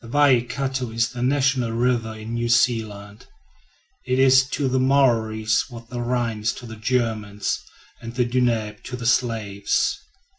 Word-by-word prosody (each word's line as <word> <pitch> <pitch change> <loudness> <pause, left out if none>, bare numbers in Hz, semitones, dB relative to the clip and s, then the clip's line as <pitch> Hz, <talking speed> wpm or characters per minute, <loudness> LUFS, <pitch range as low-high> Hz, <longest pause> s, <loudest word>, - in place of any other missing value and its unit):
The - - -10
Waikato 130 -1 +1
is 115 +1 0
the 125 -1 -7
national 130 -2 +1
river 115 -2 0
in 110 +1 -7
New 120 0 -1
Zealand. 110 -4 0 0.8
It 130 0 +1
is 130 0 +5
to 145 -2 -1
the 130 0 +1
Maories 115 -5 +2
what 115 -1 -11
the 120 -1 -4
Rhine 120 -2 -1
is 110 - 0
to 120 - -10
the 110 -1 -8
Germans, 110 -3 -1 0.4
and 115 0 -8
the 125 -1 +2
Danube 120 -4 0
to 125 - -5
the 125 -2 -7
Slavs. 110 -5 0
120 Hz, 155 wpm, -23 LUFS, 110-130 Hz, 0.8 s, is